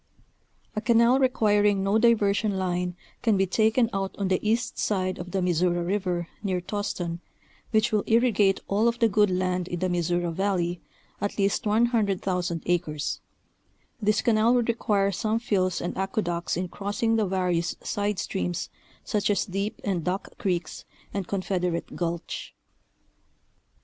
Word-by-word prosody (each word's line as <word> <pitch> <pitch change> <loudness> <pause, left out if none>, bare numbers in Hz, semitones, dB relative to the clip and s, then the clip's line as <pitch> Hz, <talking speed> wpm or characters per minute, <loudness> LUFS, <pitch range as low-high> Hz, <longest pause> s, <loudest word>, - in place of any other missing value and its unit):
A 215 - -1
canal 235 +2 +4
requiring 210 -6 +3
no 200 +3 +3
diversion 210 -3 +3
line 180 -1 -1 0.3
can 220 -4 +3
be 195 - +3
taken 220 +5 +3
out 195 -1 -2
on 195 -2 -1
the 185 - +2
east 225 +3 0
side 185 -3 0
of 175 +1 -6
the 190 0 -1
Missouri 175 0 +1
River 180 -3 -1
near 190 -3 -1
Toston, 180 -3 -3 0.5
which 220 -1 +2
will 210 -2 +2
irrigate 220 -4 +3
all 210 +4 +2
of 235 0 +1
the 230 - +4
good 210 -1 +3
land 180 -1 0
in 175 - -3
the 185 +1 -1
Missouri 175 0 0
Valley, 180 -2 -1 0.4
at 205 - -2
least 200 +1 +1
100,000 200 -6 +1
acres, 165 -4 -1 0.8
This 210 0 +2
canal 230 +1 +4
would 240 -1 +1
require 205 -4 +1
some 215 +3 0
fills 195 -6 0
and 175 - -3
aqueducts 180 -4 -1
in 180 +1 -2
crossing 205 +5 -1
the 215 -3 +1
various 180 -2 0
side 205 -1 -1
steams 90 - -3 0.3
such 210 -1 0
as 205 -2 +2
Deep 200 +1 -3
and 185 -5 -1
Duck 185 +4 -3
Creeks, 180 -7 -2 0.3
and 195 -3 -3
Confed 190 -2 -1
erate 170 -2 -2
Gulch. 170 -1 -4
195 Hz, 150 wpm, -26 LUFS, 180-215 Hz, 0.8 s, canal